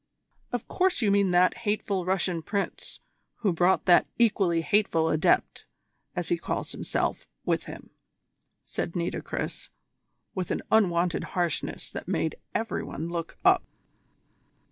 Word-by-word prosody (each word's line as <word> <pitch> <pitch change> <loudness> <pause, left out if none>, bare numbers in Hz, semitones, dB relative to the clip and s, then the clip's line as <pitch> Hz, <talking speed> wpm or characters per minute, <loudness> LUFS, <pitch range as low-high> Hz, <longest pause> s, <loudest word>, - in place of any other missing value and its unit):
"Of 245 -2 -3
course 365 -8 +1
you 205 - +3
mean 200 -1 +3
that 180 +3 +4
hateful 205 -4 -1
Russian 180 -2 0
Prince 200 +4 -3 0.4
who 200 -6 +2
brought 180 +3 +3
that 175 -2 +6
equally 195 -8 +3
hateful 165 -2 +2
Adept, 155 0 +1 0.5
as 175 -2 -2
he 170 - +1
calls - - -3
himself, - - -2 0.2
with - - 0
him," - - -10 0.7
said 170 - -4
Nitocris, 170 0 -3 0.6
with 185 -3 -3
an - - -2
unwonted 180 -5 +3
harshness 175 -3 -1
that - - -6
made 160 - -1 0.2
every 225 0 -1
one 160 +4 -5
look 170 -1 -4
up. - - +6
180 Hz, 130 wpm, -27 LUFS, 170-205 Hz, 0.7 s, that